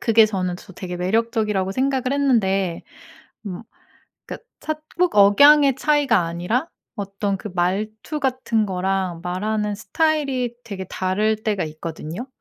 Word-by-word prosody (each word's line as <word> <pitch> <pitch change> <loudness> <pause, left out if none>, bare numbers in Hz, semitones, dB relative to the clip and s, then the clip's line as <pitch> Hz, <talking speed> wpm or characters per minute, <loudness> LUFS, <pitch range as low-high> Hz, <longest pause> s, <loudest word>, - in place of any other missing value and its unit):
그게 225 -2 +5
저는 185 -4 -2
저 190 - -14
되게 180 0 -6
매력적이라고 210 0 0
생각을 265 +1 0
했는데. 195 -10 +1 0.6
음. 185 +2 -6 0.6
그러니까 470 - -9
차 310 - -3 0.2
꼭 360 -1 +2
억양의 275 +8 +7
차이가 285 -6 +3
아니라 180 - -1 0.3
어떤 200 0 -2
그 210 - -7
말투 215 - -2
같은 255 -5 0
거랑 185 -2 -1
말하는 210 +3 -1
스타일이 275 0 0
되게 200 -4 -6
다를 200 +5 0
때가 210 -4 0
있거든요? 160 +7 -6
210 Hz, 295 characters per minute, -22 LUFS, 185-255 Hz, 0.6 s, 억양의